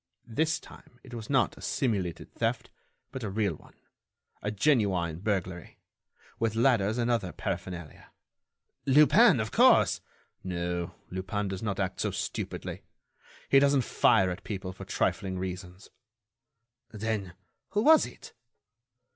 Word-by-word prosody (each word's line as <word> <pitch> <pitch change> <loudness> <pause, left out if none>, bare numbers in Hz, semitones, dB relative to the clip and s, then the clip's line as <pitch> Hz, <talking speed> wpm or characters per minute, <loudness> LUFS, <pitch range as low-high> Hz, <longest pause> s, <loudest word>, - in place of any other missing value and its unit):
This 155 +8 0
time, 125 - -16
it 130 - -13
was 115 -3 -7
not 135 -3 +2
a - - -13
simulated 100 - -2
theft, - - -2 0.4
but 130 - -6
a 105 - -2
real 100 -2 0
one, - - -16 0.7
a 105 - -2
genuine 100 - +1
burglary, 90 -4 -3 0.6
with 110 -1 0
ladders 115 -3 +3
and 120 0 +1
other 105 -7 0
paraphernalia—" 90 -4 -6 0.8
"Lupin, 150 - +6
of 110 -1 -2
course—" - - +5 0.4
"No. 85 -1 -3 0.2
Lupin 95 +2 -3
does 95 -1 -5
not 100 -3 -2
act 95 -1 -2
so - - +1
stupidly. - - -4 0.7
He 135 - +6
doesn't 140 -1 +3
fire 95 -4 +3
at 90 - -7
people 95 -3 -5
for - - -9
trifling 95 -2 -1
reasons." 90 +1 -7 1.0
"Then, 105 -4 -3 0.3
who 210 +1 0
was 315 +3 +6
it?" - - -13
105 Hz, 130 wpm, -29 LUFS, 95-120 Hz, 1.0 s, Lupin